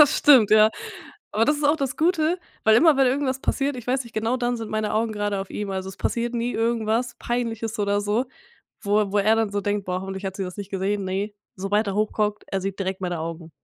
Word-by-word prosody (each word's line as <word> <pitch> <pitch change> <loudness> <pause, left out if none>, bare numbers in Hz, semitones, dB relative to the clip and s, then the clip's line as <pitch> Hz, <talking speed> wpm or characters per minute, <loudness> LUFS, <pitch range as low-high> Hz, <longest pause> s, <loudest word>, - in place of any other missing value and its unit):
Das 295 - +6
stimmt, 260 -8 +6
ja. 215 0 +7 0.6
Aber 220 - +3
das 300 +4 +2
ist 295 - -3
auch 295 +2 +4
das 275 -1 -2
Gute, 330 +1 +2 0.3
weil 220 0 +6
immer, 310 +1 +6
wenn 270 -1 +4
irgendwas 265 0 0
passiert, 275 -1 -1
ich 240 - -9
weiß 255 0 0
nicht, 235 - -13
genau 225 +3 0
dann 245 -1 -1
sind 225 -2 -6
meine 215 -1 -1
Augen 220 0 0
gerade 205 -1 -2
auf 195 - -7
ihm, 205 -1 -4
also 190 0 -3
es 190 - -9
passiert 240 +1 -2
nie 235 +1 -1
irgendwas 230 +1 0
Peinliches 230 -2 -3
oder 205 0 +1
so, 210 +5 0 0.6
wo 205 +1 +2
er 200 -2 -2
wo 205 - +2
er 215 +3 +4
dann 225 -2 +1
so 205 0 -1
denkt: 205 0 -1
„Boah, 180 0 -2
hoffentlich 190 +1 -6
hat 190 0 -4
sie 195 - -3
das 180 +1 -7
nicht 200 -1 -7
gesehen.“ 195 +1 -1
Ne, 195 +3 -2 0.2
sobald 205 +3 0
er 195 - -2
hochguckt, 210 0 0
er 195 - -2
sieht 195 0 -4
direkt 190 -1 -3
meine 175 -3 -3
Augen. 165 0 -6
215 Hz, 245 wpm, -24 LUFS, 195-245 Hz, 0.6 s, ja